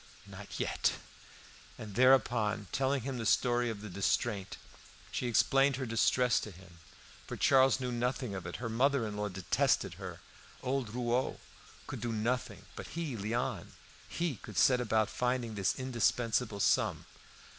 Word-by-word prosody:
"Not - - -9
yet." - - +1 0.8
And 105 -2 -8
thereupon, 120 -3 +3
telling 135 0 +1
him 130 -1 -4
the 115 - -3
story 120 +1 +2
of 110 -3 -5
the 105 - -7
distraint, 100 +1 -1 0.5
she 125 - -2
explained 135 +3 +3
her 130 0 -3
distress 120 +2 +2
to - - -6
him; 90 -3 -15 0.5
for - - -5
Charles 135 0 +4
knew 125 -1 -3
nothing 125 -1 -2
of 95 -2 -5
it; 85 - -6
her 120 - -4
mother 125 +2 +2
in 105 -1 -5
law 105 0 -2
detested 95 -1 +1
her; - - -7 0.4
old 130 -3 -1
Rouault 125 +1 0 0.5
could - - -7
do 120 - -2
nothing; 115 +4 -2
but - - -7
he, 160 -6 -4
Léon, 115 +3 -2 0.4
he 165 - -2
would 105 -4 -8
set 125 -1 +5
about 110 -2 +2
finding 125 -2 -1
this 100 -3 0
indispensable 120 -3 0
sum. - - +2
120 Hz, 155 wpm, -32 LUFS, 105-130 Hz, 0.8 s, set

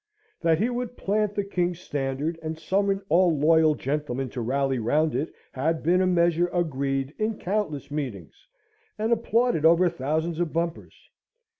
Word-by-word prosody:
That 165 -2 +3
he 215 +7 +1
would 245 0 -4
plant 210 +1 0
the 205 - 0
King's 180 -3 -1
standard, 145 +1 -3
and 160 0 -4
summon 195 +3 0
all 175 -2 +3
loyal 155 +1 +4
gentlemen 135 -2 -2
to 125 - -4
rally 135 +2 0
round 150 +8 +1
it, 140 +6 -2 0.2
had 155 +5 -1
been 180 +4 +3
a 185 - +2
measure 175 -1 +3
agreed 140 -5 -1
in 215 0 -1
countless 180 -8 -3
meetings, 125 - -6 0.5
and 220 +2 -1
applauded 235 -5 +1
over 170 +2 +5
thousands 160 +2 -2
of 175 -3 0
bumpers. 165 0 -3
165 Hz, 155 wpm, -26 LUFS, 145-185 Hz, 0.5 s, over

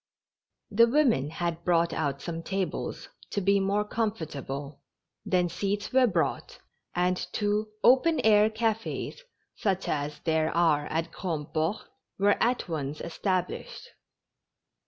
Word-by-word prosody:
The 230 +3 +6
woinen 235 - +3
had 170 0 -3
brought 170 -1 +2
out 140 -3 -2
some 165 -1 -4
tables, 190 +2 -3 0.2
to - - -1
be 200 +1 +3
more 200 +2 +1
comfortable, 150 - -4 0.5
tlien 180 -2 +2
seats 205 +6 -2
were 260 -1 +5
brought, 165 -8 -1 0.4
and 180 +1 +2
two 210 +1 0 0.2
open 285 +6 +5
air 215 -1 +5
cafes, 225 - -2 0.3
such 195 -2 -1
as 150 0 -2
there 160 -1 +1
are 155 -4 +3
at 165 +1 -2
Grandport, 160 +2 -2 0.4
were 205 +1 +3
at 245 -2 +1
once 150 -3 -3
established. 185 - -3
180 Hz, 120 wpm, -28 LUFS, 160-210 Hz, 0.5 s, The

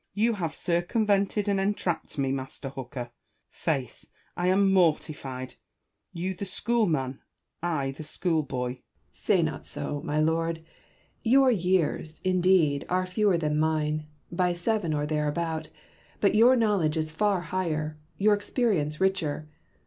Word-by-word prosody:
Bacon. 205 - 0
You 235 0 +4
have 170 -7 -3
circumvented 200 +3 +1
and 200 -1 +2
entrapped 195 -6 -1
me. 135 -1 +1
Master 135 0 -5
Hooker. 130 -2 -7 0.4
Faith! - - -3 0.3
I 175 - 0
am 195 +1 +4
mortified: 145 -7 0 0.6
you 180 +2 -3
the 185 - -7
school 225 +4 0
man, 135 -5 -1 0.4
I 155 -6 -1
the 140 +3 -8
schoolboy! 150 -6 -1
Hooker. - - -34 0.3
Say - - +1
not - - -3
so, 145 -1 -3
my 150 - -1
Lord. 165 +1 0 0.6
Your 260 +2 +5
years, 180 -5 0
indeed, 180 -6 +3
are 185 +1 +1
fewer 185 0 +2
than 150 -2 0
mine, 155 -1 0 0.2
by 180 0 +1
seven 175 0 0
or 145 0 0
thereabout; 155 +1 -1 0.5
but 200 - +3
your 235 +4 +6
know 220 -4 +3
ledge 155 -3 0
is 155 0 -1
far 195 +2 +1
higher, 155 -5 -2 0.2
your 210 +2 +4
experience 205 - 0
richer. 160 -6 0
170 Hz, 140 wpm, -27 LUFS, 150-195 Hz, 0.6 s, your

